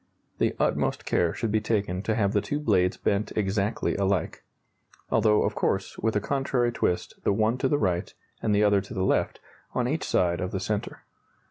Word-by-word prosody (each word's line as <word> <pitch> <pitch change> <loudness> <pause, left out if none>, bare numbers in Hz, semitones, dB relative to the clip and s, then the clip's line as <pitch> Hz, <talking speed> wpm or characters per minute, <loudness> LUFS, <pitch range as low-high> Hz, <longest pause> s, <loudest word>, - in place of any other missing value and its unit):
The - - +1
utmost - - 0
care 85 - +2
should 115 +4 -3
be 110 0 +2
taken 100 -4 -1
to 110 +1 -1
have 100 -3 +1
the 105 - +2
two 145 - -2
blades 95 -10 +2
bent 100 +1 0
exactly 105 +1 0
alike 95 -4 0 0.7
although, 110 -1 +4
of - - 0
course, - - -1
with 110 0 0
a - - +3
contrary 125 0 0
twist, 90 -6 -1
the - - +2
one 110 +4 +1
to 135 - +2
the 145 - +2
right 90 -7 0 0.3
and 110 - 0
the 105 - +3
other 100 -1 +4
to 100 - -10
the 95 -1 0
left, - - +1 0.4
on 125 -1 +1
each 155 +5 -1
side 85 -2 +1
of 90 - -2
the 95 - -3
centre. 105 +2 -3
105 Hz, 200 wpm, -26 LUFS, 95-115 Hz, 0.7 s, although